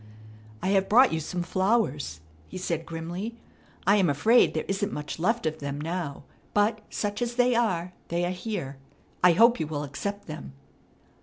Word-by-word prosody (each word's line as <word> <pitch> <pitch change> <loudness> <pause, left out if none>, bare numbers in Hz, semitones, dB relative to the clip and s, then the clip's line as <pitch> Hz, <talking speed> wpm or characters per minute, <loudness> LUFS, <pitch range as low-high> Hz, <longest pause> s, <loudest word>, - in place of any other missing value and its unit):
"I - - +1
have 195 -1 +2
brought 250 +1 +6
you 160 - 0
some 175 +3 -3
flowers," 185 - 0 0.3
he - - -8
said 165 -3 -3
grimly. 175 +7 -5 0.5
"I 200 +3 +5
am 185 -5 +3
afraid 215 - +4
there - - -1
isn't 200 +1 -1
much 150 +2 -5
left 225 +4 +1
of 155 0 -1
them 140 0 -4
now; 160 -2 -4 0.3
but, 215 +1 +2
such 205 +1 -3
as 240 0 -1
they 250 0 +4
are, 185 -7 0
they 170 +1 0
are 175 - -1
here. 180 -7 -4 0.5
I 180 -1 +7
hope 230 +6 +5
you 160 - -1
will 150 -1 -3
accept 200 +9 -5
them." 155 -3 -8
180 Hz, 175 wpm, -27 LUFS, 160-210 Hz, 0.5 s, I